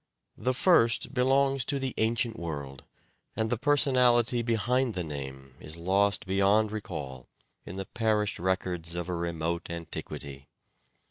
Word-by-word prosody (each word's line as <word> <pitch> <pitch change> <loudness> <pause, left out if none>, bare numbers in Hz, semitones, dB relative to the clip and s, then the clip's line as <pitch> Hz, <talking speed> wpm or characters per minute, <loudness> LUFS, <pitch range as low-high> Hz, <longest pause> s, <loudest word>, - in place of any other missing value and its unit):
The 130 0 0
first 125 -7 +3
belongs 135 +1 +3
to 140 - 0
the 135 -2 -3
ancient 115 +1 +1
world 70 - -6 0.5
and 110 0 -1
the - - +3
personality 125 -4 +4
behind 120 +1 0
the 90 - -2
name 65 -3 -7
is 75 +2 -9
lost 95 +1 +1
beyond 100 +3 +3
recall 75 - -6 0.4
in 95 - -7
the 95 - -4
perished 110 -2 0
records 90 -2 -1
of 85 +1 -4
a 90 - -1
remote 85 0 -3
antiquity. 70 -4 -6
100 Hz, 135 wpm, -28 LUFS, 85-120 Hz, 0.5 s, personality